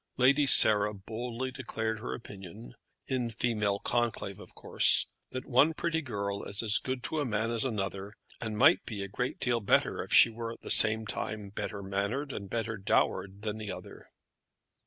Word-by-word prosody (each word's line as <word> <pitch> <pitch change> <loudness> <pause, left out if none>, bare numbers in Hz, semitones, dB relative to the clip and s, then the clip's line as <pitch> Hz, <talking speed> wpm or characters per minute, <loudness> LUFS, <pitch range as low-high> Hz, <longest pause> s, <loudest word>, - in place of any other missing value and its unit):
Lady 140 +3 +4
Sarah 105 -4 +6
boldly 115 +5 -5
declared 110 -4 -4
her 115 - -5
opinion, 100 +1 -11 0.3
in 125 -3 -2
female 110 -3 -1
conclave 120 +1 -2
of - - -14
course, - - +4 0.2
that 130 0 -6
one 140 +6 +3
pretty 160 -1 -1
girl 100 -7 -4
is 100 +3 -4
as 105 -2 +3
good 130 -1 -4
to 155 - -1
a - - 0
man 110 -1 -1
as 115 -1 0
another, 100 -4 -4 0.3
and 110 -2 -4
might 145 +9 +5
be 105 -4 -6
a - - -5
great 125 +6 -4
deal 120 -1 0
better 100 - +1
if - - -13
she 115 - +7
were 115 0 -6
at - - -16
the - - -2
same 110 +1 +5
time 105 0 -5
better 100 0 -6
mannered 100 +9 -3
and 100 -5 -7
better 115 +1 -3
dowered 100 0 -1
than 110 0 -4
the 105 -2 -5
other. - - -10
110 Hz, 180 wpm, -29 LUFS, 100-125 Hz, 0.3 s, she